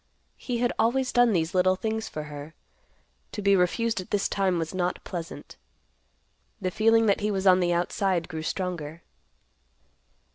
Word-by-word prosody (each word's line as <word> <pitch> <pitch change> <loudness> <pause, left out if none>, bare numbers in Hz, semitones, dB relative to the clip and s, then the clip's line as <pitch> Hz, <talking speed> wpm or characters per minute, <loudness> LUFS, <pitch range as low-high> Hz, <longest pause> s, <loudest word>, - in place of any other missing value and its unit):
He 245 -2 -3
had 240 0 +1
always 255 +3 +2
done 245 -1 +4
these 165 -4 0
little 185 0 +3
things 220 +2 -3
for 155 - -5
her. 150 +1 -9 0.8
To 210 - -4
be 200 0 +5
refused 200 +4 +1
at 185 - -12
this 205 -1 +1
time 190 -3 0
was 165 +1 -3
not 180 -1 -2
pleasant. 170 -3 -7 1.0
The 185 -3 -2
feeling 225 +3 +4
that 200 -1 +2
he 210 - 0
was 195 -2 -1
on 185 -1 +6
the 175 -1 +2
outside 175 0 0
grew 160 -1 -5
stronger. 170 -2 -4
185 Hz, 160 wpm, -26 LUFS, 170-220 Hz, 1.0 s, on